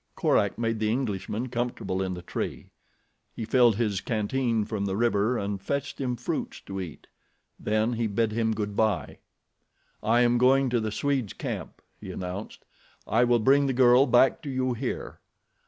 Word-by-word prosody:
Korak - - +2
made 115 -1 -1
the 110 0 +1
Englishman 115 0 -2
comfortable 120 -6 -2
in 95 -1 -2
the 90 - -9
tree. - - -5 0.6
He 110 - -4
filled 120 -2 +4
his 105 -4 -1
canteen 115 0 0
from 105 -2 -3
the 95 -1 -1
river 115 +1 +2
and 100 -1 -3
fetched 140 +6 -3
him 125 -2 -1
fruits - - -4
to 95 -1 -6
eat. 85 -4 -8 0.5
Then 110 +3 0
he 115 -1 0
bid 110 +1 0
him 110 0 0
good 105 -1 -3
bye. 110 -4 0 0.8
"I 115 +3 +3
am 120 0 +3
going 130 +1 +4
to 120 - +2
the 110 -1 -2
Swede's 135 -3 -1
camp," - - -6 0.2
he - - -9
announced. 95 +3 -6 0.4
"I 115 +3 +3
will 120 0 +4
bring 140 +5 +4
the 135 - 0
girl 125 +2 +5
back 125 +2 +4
to 150 - -6
you 130 -1 0
here." 125 +2 -5
115 Hz, 170 wpm, -27 LUFS, 105-125 Hz, 0.8 s, girl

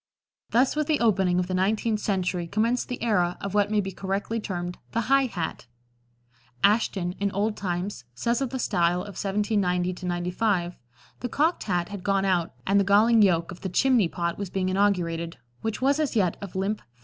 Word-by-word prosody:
Thus 250 +5 +3
with 305 -1 0
the 305 -2 +2
opening 190 -6 +2
of 180 - +1
the 185 - -4
nineteenth 210 +4 +1
century 180 -4 -1
commenced 230 +6 0
the 250 - -4
era 180 -6 +1
of 200 - -5
what 205 -1 +2
may 210 -1 +2
be 195 -1 -4
correctly 195 +4 -2
termed 175 -4 -4
the 230 - +1
high 270 +2 +3
hat. 170 - -5 1.0
Ashton, 200 -4 +2
in 200 0 +1
"Old 210 +2 0
Times," 180 -6 -3
says 235 - 0
of 270 - 0
the 260 - -4
style 175 -6 +1
of 200 +1 -8
1790 195 -3 0
95: 175 +1 0 0.4
"The 245 - -4
'cocked' 315 +8 +1
hat 175 -3 -1
had 200 -3 -7
gone 195 -1 +1
out, 180 -3 +1
and 200 +1 +3
the - - +4
galling 215 +4 +5
yoke 170 -4 +3
of 180 - -10
the 190 - -3
'chimney 240 +1 +3
pot' 170 +1 -3
was 200 -3 -4
being 185 0 -1
inaugurated, 175 -4 0 0.2
which 225 +3 -3
was 280 +3 +3
as 300 -5 0
yet 185 -6 +2
of 200 -3 -8
limp 195 +3 -1
felt." - - -27
195 Hz, 195 wpm, -26 LUFS, 180-220 Hz, 1.0 s, galling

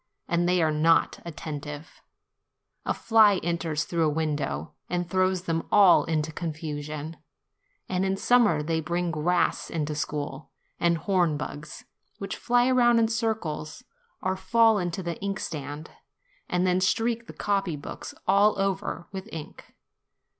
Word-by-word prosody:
And 175 +1 +1
they 180 -2 +3
are 155 - +2
not 160 +2 +3
attentive: 150 -2 -7 0.9
a - - +2
fly 220 -3 +5
enters 165 -3 -1
through 170 - -4
the - - +3
window, 145 - -2 0.2
and 175 -1 -1
throws 185 0 +1
them 165 -2 -2
all 200 -4 +6
into 155 -1 -1
confusion; 155 -1 -5 0.7
and 185 0 -1
in 195 0 0
summer 215 -10 +3
they 160 +1 -1
bring 170 +2 -1
grass 170 +3 0
into 155 -2 -2
school, 145 -1 -4 0.3
and 170 -1 +2
horn 175 -4 +1
bugs, 145 +2 -7 0.3
which 200 - -5
fly 245 +1 +2
round 240 -2 +5
in 225 -1 +3
circles 220 -6 -3 0.4
or 185 -1 0
fall 225 +2 +3
into 175 +1 -3
the 170 -1 -5
inkstand, 155 -7 -5 0.6
and 180 +1 +1
then 185 0 +2
streak 230 +5 0
the - - -8
copy 195 -5 -1
books 145 - -8
all 200 +2 +4
over 195 -3 -2
with 195 +2 -7
ink. 155 -2 -9
170 Hz, 140 wpm, -26 LUFS, 155-195 Hz, 0.9 s, all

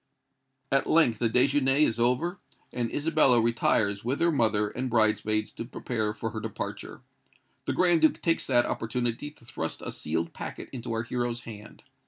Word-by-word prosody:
At 135 0 +2
length 125 -9 +4
the 115 - +1
déjeuner 135 +3 +3
is 120 -7 +3
over; 150 +10 +1 0.3
and 120 -2 -2
Isabella 150 -5 +3
retires 110 -3 +1
with 125 +4 -1
her 170 0 +3
mother 110 -7 +2
and 130 +4 -4
bridemaids 110 -2 +1
to - - -6
prepare 110 -3 -3
for 115 +1 -4
her 110 - -5
departure. 110 -2 -6 0.6
The - - -1
Grand 175 -3 +3
Duke 155 - +3
takes 165 -1 0
that 120 0 +3
opportunity 120 +4 -2
to 145 - -19
thrust 80 -8 -5
a - - -3
sealed 80 +2 -3
packet - - -7
into 120 -2 -6
our 115 0 -1
hero's 120 0 -2
hand. 110 -2 -11
120 Hz, 170 wpm, -27 LUFS, 110-135 Hz, 0.6 s, length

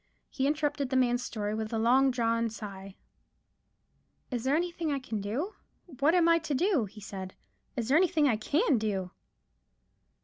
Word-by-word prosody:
He 270 -1 0
interrupted 295 -2 0
the 260 - -1
man's 245 -1 +2
story 210 -3 -3
with 220 0 -3
a 225 - -1
long 255 +4 +4
drawn 230 -2 +1
sigh,— 195 -3 -8 1.4
"Is 240 -2 -2
there 270 +2 +3
anything 335 -1 -1
I 280 - 0
can 230 -6 -4
do? 265 - -3 0.5
What 300 +5 +4
am 345 -2 +4
I 335 0 +5
to 310 -3 -3
do?" 335 - +2
he 210 +2 -12
said. 190 -2 -7 0.4
"Is 235 -3 -2
there 275 +4 +4
anything 335 -4 +3
I 240 - +3
can 280 - +1
do?" 195 -4 -2
255 Hz, 170 wpm, -29 LUFS, 215-300 Hz, 1.4 s, I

